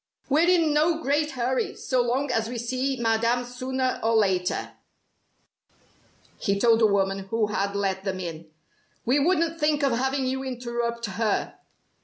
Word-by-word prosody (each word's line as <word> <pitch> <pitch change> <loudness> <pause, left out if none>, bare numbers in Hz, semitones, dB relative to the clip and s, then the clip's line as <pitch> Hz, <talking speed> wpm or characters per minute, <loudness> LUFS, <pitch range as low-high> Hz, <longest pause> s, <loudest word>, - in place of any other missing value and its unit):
"We're 315 +5 +4
in 335 -4 +3
no 315 +2 +2
great 300 0 0
hurry, 255 0 -1
so 255 -2 0
long 255 +3 0
as 225 -2 0
we 245 - -4
see 255 +3 -2
Madame 230 +2 +1
sooner 255 +1 -2
or 225 +1 +1
later," 190 -4 +1 1.7
he 200 0 0
told 230 +1 +4
the 225 - +5
woman 195 -1 +1
who 225 0 +1
had 200 -1 -2
let 195 -1 -1
them 190 -2 -3
in. 165 -3 -6 0.6
"We 255 +5 +3
wouldn't 330 +1 +1
think 300 -1 +1
of 275 - +3
having 265 +3 0
you 265 +1 -2
interrupt 235 -2 -3
her." 210 +1 -1
245 Hz, 155 wpm, -25 LUFS, 220-270 Hz, 1.7 s, the